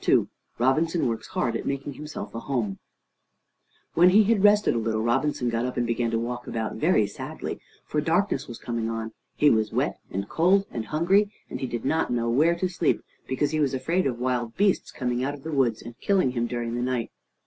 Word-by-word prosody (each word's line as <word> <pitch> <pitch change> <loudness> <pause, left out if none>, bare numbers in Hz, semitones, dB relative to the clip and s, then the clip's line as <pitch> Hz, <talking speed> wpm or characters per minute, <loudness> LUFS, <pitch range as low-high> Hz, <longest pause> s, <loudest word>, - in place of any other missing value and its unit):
II - - +4 0.3
ROBINSON 160 +8 +2
WORKS 115 -1 -3
HARD 115 -2 -1
AT - - -3
MAKING 140 +1 -3
HIMSELF 150 +2 -7
A 115 - -4
HOME 115 -7 -2 1.1
When 175 +2 +6
he 210 +4 +6
had 210 -1 +2
rested 210 0 +5
a 120 - 0
little, 110 -1 -1
Robinson 130 +2 +1
got 115 0 0
up 125 - -4
and 120 - +1
began 115 0 0
to 115 - 0
walk 120 +1 -4
about 110 -1 -3
very 155 - +3
sadly, 100 - -6 0.3
for 150 - -1
darkness 175 +6 +1
was 120 - -7
coming 115 -1 -3
on; 115 -1 -4 0.2
he 150 - +5
was 110 -1 +1
wet, - - -1
and 100 +1 -3
cold, 190 - +3
and 115 -2 -4
hungry, 190 +7 +2 0.2
and - - -4
he 130 - -2
did 120 0 -4
not 160 +4 +1
know 115 -1 0
where 155 +8 +4
to 185 +2 0
sleep, 175 -2 0 0.2
because 130 +3 0
he 155 - 0
was 140 -3 +1
afraid 165 +6 0
of 125 -3 -2
wild 120 -2 -2
beasts 200 -1 +2
coming 125 -2 -2
out 145 +2 -1
of 140 - -14
the 160 - -5
woods 125 -6 +1
and 120 +1 -10
killing 190 -10 +2
him 120 -1 -1
during 120 -1 -3
the 120 - -2
night. 125 -2 -1
130 Hz, 215 wpm, -26 LUFS, 115-160 Hz, 1.1 s, When